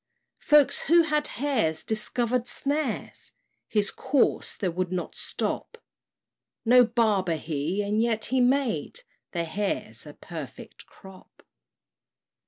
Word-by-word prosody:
Folks 295 Hz, -2 st, +4 dB
who 335 Hz, +3 st, +6 dB
had 300 Hz, -1 st, 0 dB
hares 225 Hz, -, 0 dB
discovered 235 Hz, +2 st, 0 dB
snares 280 Hz, -1 st, -3 dB, 0.3 s
His 210 Hz, -2 st, 0 dB
course 265 Hz, 0 st, 0 dB
they 185 Hz, -4 st, -1 dB
could 180 Hz, +1 st, -2 dB
not 180 Hz, -1 st, -3 dB
stop: 470 Hz, -, -3 dB, 0.9 s
No 250 Hz, +2 st, +7 dB
barber 215 Hz, -7 st, +1 dB
he, 160 Hz, +5 st, -2 dB
and 210 Hz, +2 st, 0 dB
yet 225 Hz, -2 st, +1 dB
he 260 Hz, +1 st, +1 dB
made 265 Hz, -, +1 dB, 0.3 s
Their 170 Hz, -2 st, -1 dB
hares 200 Hz, +5 st, -3 dB
a -, -, -11 dB
perfect -, -, -9 dB
crop. 190 Hz, -2 st, -16 dB
225 Hz, 115 wpm, -26 LUFS, 190-265 Hz, 0.9 s, No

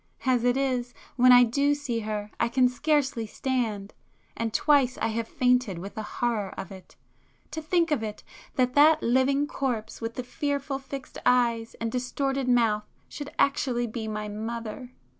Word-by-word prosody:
As 250 Hz, -2 st, +2 dB
it 245 Hz, +1 st, +2 dB
is, 250 Hz, -3 st, -1 dB, 0.2 s
when 255 Hz, 0 st, +6 dB
I 245 Hz, 0 st, +9 dB
do 280 Hz, +5 st, +2 dB
see 265 Hz, -5 st, -3 dB
her 210 Hz, -1 st, -4 dB
I -, -, +2 dB
can 250 Hz, +1 st, +4 dB
scarcely 265 Hz, -3 st, 0 dB
stand—and 225 Hz, -2 st, -4 dB
twice 275 Hz, -1 st, +3 dB
I -, -, 0 dB
have 225 Hz, 0 st, -2 dB
fainted 250 Hz, -7 st, +1 dB
with 195 Hz, +4 st, -7 dB
the 220 Hz, -, -5 dB
horror 215 Hz, -3 st, -2 dB
of 195 Hz, 0 st, -6 dB
it. 190 Hz, -2 st, -13 dB, 0.6 s
To 320 Hz, -, -4 dB
think 335 Hz, +1 st, +1 dB
of 290 Hz, -6 st, +1 dB
it!—that 250 Hz, -, -4 dB
that 305 Hz, +2 st, +5 dB
living 260 Hz, +4 st, +2 dB
corpse 250 Hz, -7 st, -3 dB
with 230 Hz, 0 st, -4 dB
the 250 Hz, -, -3 dB
fearful 280 Hz, 0 st, -2 dB
fixed 270 Hz, 0 st, -8 dB
eyes 235 Hz, -2 st, +2 dB
and 230 Hz, 0 st, -2 dB
distorted 270 Hz, +2 st, -1 dB
mouth 225 Hz, -4 st, +2 dB, 0.2 s
should 290 Hz, -1 st, -7 dB
actually 255 Hz, -4 st, +1 dB
be 225 Hz, -1 st, -5 dB
my 215 Hz, -1 st, -4 dB
mother!" 225 Hz, +3 st, -5 dB
245 Hz, 160 wpm, -27 LUFS, 225-275 Hz, 0.6 s, I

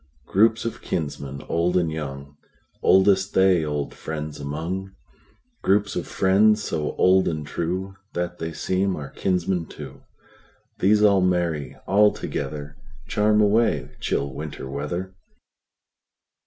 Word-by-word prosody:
Groups 110 Hz, +3 st, +3 dB
of 115 Hz, -, -4 dB
kinsmen, 70 Hz, -3 st, -4 dB
old 85 Hz, +2 st, +1 dB
and 85 Hz, -3 st, +1 dB
young, 70 Hz, -2 st, -6 dB, 0.5 s
Oldest 95 Hz, 0 st, +4 dB
they 95 Hz, -3 st, +4 dB
old 75 Hz, -2 st, -3 dB
friends 75 Hz, -1 st, -6 dB
among; 85 Hz, +7 st, -4 dB, 0.7 s
Groups 100 Hz, +1 st, +2 dB
of -, -, -3 dB
friends, 105 Hz, +3 st, +3 dB
so 75 Hz, -5 st, -2 dB
old 95 Hz, +1 st, +4 dB
and 75 Hz, -2 st, -2 dB
trueThat 90 Hz, +2 st, -4 dB
they 80 Hz, 0 st, -3 dB
seem 95 Hz, +3 st, 0 dB
our 70 Hz, -2 st, -7 dB
kinsmen 90 Hz, -2 st, -1 dB
too; -, -, -10 dB, 0.8 s
These 105 Hz, +2 st, +4 dB
all 100 Hz, -2 st, +5 dB
merry 85 Hz, -5 st, 0 dB
all 105 Hz, +2 st, +5 dB
togetherCharm 75 Hz, +8 st, -2 dB
away 110 Hz, +3 st, +1 dB
chill 70 Hz, -1 st, -1 dB
Winter 75 Hz, -1 st, -6 dB
weather. 80 Hz, +7 st, -4 dB
90 Hz, 115 wpm, -24 LUFS, 75-95 Hz, 0.8 s, all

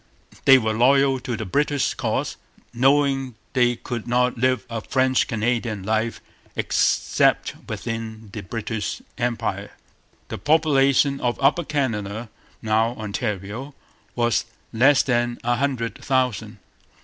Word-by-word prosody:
They 135 Hz, -1 st, +9 dB
were 110 Hz, -3 st, 0 dB
loyal 135 Hz, +3 st, +4 dB
to 120 Hz, -2 st, -4 dB
the 110 Hz, -, -4 dB
British 145 Hz, +7 st, 0 dB
cause, -, -, -2 dB, 0.4 s
knowing 135 Hz, 0 st, +2 dB, 0.2 s
they 120 Hz, -1 st, +3 dB
could 120 Hz, -1 st, -6 dB
not 125 Hz, +1 st, +2 dB
live 130 Hz, -2 st, +1 dB
a 115 Hz, -1 st, -4 dB
French 130 Hz, +2 st, +1 dB
Canadian 115 Hz, -2 st, -1 dB
life 110 Hz, +3 st, -1 dB, 0.3 s
except -, -, +2 dB, 0.2 s
within 110 Hz, -2 st, -5 dB
the 105 Hz, -, -5 dB
British 105 Hz, -2 st, -4 dB, 0.2 s
Empire. 120 Hz, -1 st, -2 dB, 0.6 s
The -, -, -5 dB
population 140 Hz, -3 st, +3 dB
of 120 Hz, -1 st, 0 dB
Upper 145 Hz, +5 st, +3 dB
Canada, 115 Hz, -7 st, -2 dB, 0.3 s
now 110 Hz, +2 st, +1 dB
Ontario, 110 Hz, +4 st, -4 dB, 0.4 s
was 120 Hz, -1 st, +1 dB, 0.3 s
less 135 Hz, +5 st, +5 dB
than 120 Hz, -2 st, 0 dB
a 120 Hz, 0 st, +1 dB
hundred 130 Hz, -4 st, -2 dB
thousand. 130 Hz, -5 st, -1 dB
120 Hz, 120 wpm, -23 LUFS, 110-135 Hz, 0.6 s, They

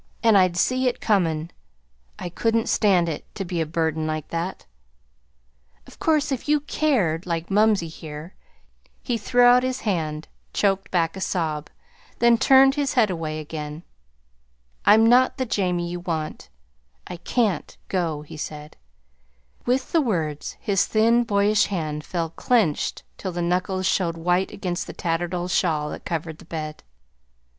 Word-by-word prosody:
And 225 Hz, -2 st, +5 dB
I'd 185 Hz, -3 st, +4 dB
see 255 Hz, +7 st, +2 dB
it 245 Hz, -, -1 dB
comin'. 170 Hz, -6 st, +1 dB, 0.7 s
I -, -, -5 dB
couldn't 225 Hz, +5 st, 0 dB
stand 185 Hz, -5 st, +3 dB
it 160 Hz, -3 st, -4 dB
to 195 Hz, -, -4 dB
be 175 Hz, -1 st, -2 dB
a 160 Hz, -, -1 dB
burden 160 Hz, 0 st, -1 dB
like 155 Hz, -1 st, -3 dB
that. 170 Hz, +3 st, -4 dB, 1.2 s
Of -, -, -16 dB
course, 305 Hz, -2 st, +2 dB
if 270 Hz, +2 st, -3 dB
you 300 Hz, -1 st, +3 dB
CARED 205 Hz, -, 0 dB
like 170 Hz, +1 st, -3 dB
mumsey 210 Hz, -3 st, +3 dB
here 155 Hz, +1 st, -9 dB, 0.3 s
" -, -, -39 dB, 0.3 s
He 245 Hz, -, -1 dB
threw 245 Hz, +4 st, +3 dB
out 245 Hz, +1 st, +7 dB
his 255 Hz, 0 st, -2 dB
hand, 160 Hz, -6 st, -2 dB, 0.3 s
choked 195 Hz, -1 st, +1 dB
back 165 Hz, -2 st, 0 dB
a 190 Hz, -, -7 dB
sob, 155 Hz, -5 st, -2 dB, 0.5 s
then 235 Hz, -1 st, +4 dB
turned 270 Hz, 0 st, +6 dB
his 285 Hz, -2 st, -1 dB
head 220 Hz, -6 st, +4 dB
away 155 Hz, -3 st, -3 dB
again. 150 Hz, +1 st, -6 dB, 1.0 s
"I'm 220 Hz, +2 st, +7 dB
not 250 Hz, +3 st, +4 dB
the 260 Hz, -, -1 dB
Jamie 180 Hz, -6 st, -1 dB
you 175 Hz, -, -4 dB
want. 160 Hz, -, -4 dB, 0.6 s
I 180 Hz, -, -7 dB
can't 205 Hz, -2 st, -1 dB
go," 165 Hz, -5 st, -1 dB
he 150 Hz, -, -11 dB
said. 150 Hz, 0 st, -7 dB, 0.9 s
With 255 Hz, +1 st, 0 dB
the 330 Hz, -, +4 dB
words 160 Hz, -, -2 dB
his 200 Hz, -3 st, +1 dB
thin, 230 Hz, +2 st, +3 dB
boyish 205 Hz, 0 st, +3 dB
hand 155 Hz, -6 st, -3 dB
fell 165 Hz, -2 st, -3 dB
clenched 205 Hz, -5 st, 0 dB, 0.2 s
till 185 Hz, -2 st, -4 dB
the 175 Hz, 0 st, -2 dB
knuckles 185 Hz, +2 st, 0 dB
showed 170 Hz, -3 st, +1 dB
white 180 Hz, +3 st, +1 dB
against 180 Hz, -2 st, -4 dB
the -, -, -7 dB
tattered 175 Hz, +1 st, -2 dB
old 180 Hz, +1 st, -3 dB
shawl 155 Hz, -5 st, +1 dB
that -, -, -8 dB
covered 160 Hz, -1 st, -4 dB
the -, -, -14 dB
bed. 155 Hz, -2 st, -6 dB
180 Hz, 160 wpm, -24 LUFS, 160-220 Hz, 1.2 s, out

